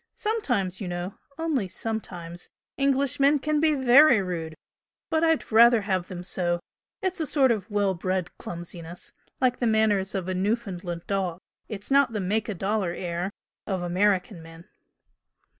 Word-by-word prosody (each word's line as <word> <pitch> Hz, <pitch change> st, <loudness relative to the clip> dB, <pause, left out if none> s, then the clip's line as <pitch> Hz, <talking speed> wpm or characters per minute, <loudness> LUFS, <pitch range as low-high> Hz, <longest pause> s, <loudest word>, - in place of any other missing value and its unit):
Sometimes, 245 Hz, -, -1 dB
you 195 Hz, -, -3 dB
know 175 Hz, +2 st, -4 dB, 0.2 s
only 310 Hz, -11 st, 0 dB
sometimes 180 Hz, -5 st, -5 dB, 0.3 s
Englishmen 275 Hz, +1 st, +3 dB
can 300 Hz, +2 st, 0 dB
be 310 Hz, -1 st, +3 dB
VERY 265 Hz, -1 st, +6 dB
rude! 170 Hz, -4 st, -4 dB, 0.6 s
But 320 Hz, 0 st, +2 dB
I'd 325 Hz, -5 st, +1 dB
rather 235 Hz, +1 st, +7 dB
have 190 Hz, -3 st, -1 dB
them 180 Hz, -1 st, -7 dB
so 175 Hz, -1 st, -1 dB, 0.4 s
it's 375 Hz, -2 st, -1 dB
a 315 Hz, -, -1 dB
sort 265 Hz, -2 st, +4 dB
of 215 Hz, -2 st, -2 dB
well 205 Hz, -2 st, +1 dB
bred 185 Hz, 0 st, -2 dB
clumsiness, 170 Hz, 0 st, -7 dB, 0.3 s
like 255 Hz, -1 st, +2 dB
the 240 Hz, -, +1 dB
manners 210 Hz, -3 st, +2 dB
of 185 Hz, -2 st, -2 dB
a 185 Hz, -, -1 dB
Newfoundland 185 Hz, -4 st, -2 dB
dog. 190 Hz, -4 st, -1 dB, 0.3 s
It's 205 Hz, +3 st, -7 dB
not 275 Hz, -3 st, +4 dB
the 210 Hz, -, -1 dB
'make 210 Hz, +4 st, -1 dB
a 210 Hz, -, -2 dB
dollar' 195 Hz, -1 st, -1 dB
air 175 Hz, +1 st, -3 dB, 0.4 s
of 190 Hz, -3 st, -2 dB
American 185 Hz, +1 st, +1 dB
men." 165 Hz, +1 st, -13 dB
200 Hz, 155 wpm, -26 LUFS, 180-250 Hz, 0.6 s, rather